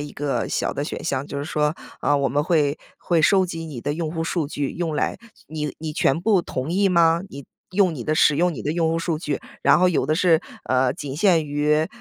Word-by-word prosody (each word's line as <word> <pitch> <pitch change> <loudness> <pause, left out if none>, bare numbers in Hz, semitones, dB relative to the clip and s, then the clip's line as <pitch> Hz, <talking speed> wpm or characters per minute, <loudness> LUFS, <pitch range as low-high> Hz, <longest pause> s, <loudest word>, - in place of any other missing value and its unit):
一 145 0 -6
个 145 -1 -2
小 - - -1
的 145 - -3
选 150 - -5
项， 135 -4 -1
就 140 - -6
是 140 - -4
说； 150 0 0 0.3
“啊， 145 - +2
我 140 -1 +1
们 145 +1 +1
会 150 -3 +1 0.2
会 165 -3 +1
收 190 +2 +4
集 165 -1 -6
你 135 -6 -7
的 145 +3 -2
用 160 -1 -3
户 165 0 -3
数 165 -4 -1
据， 145 -3 -3
用 165 -3 -3
来 - - -1 0.3
你 150 -2 -4
你 155 -1 -5
全 150 +1 +1
部 195 -2 +3
同 135 +4 -4
意 195 +1 +3
吗？ 170 -1 +3
你 140 -1 -9 0.3
用 185 -3 +2
你 125 - -6
的 155 - 0
使 150 - +5
用 175 +2 +2
你 125 - -7
的 150 - -1
用 165 -1 +1
户 165 - 0
数 165 -1 -1
据。” 150 -2 -3 0.2
然 - - +5
后 185 - +4
有 180 - +1
的 155 - +1
是， 165 -2 +4 0.2
呃， 130 0 +2
“仅 140 -1 -6
限 170 -4 +3
于， 150 +2 +1
155 Hz, 260 characters per minute, -23 LUFS, 145-170 Hz, 0.3 s, 使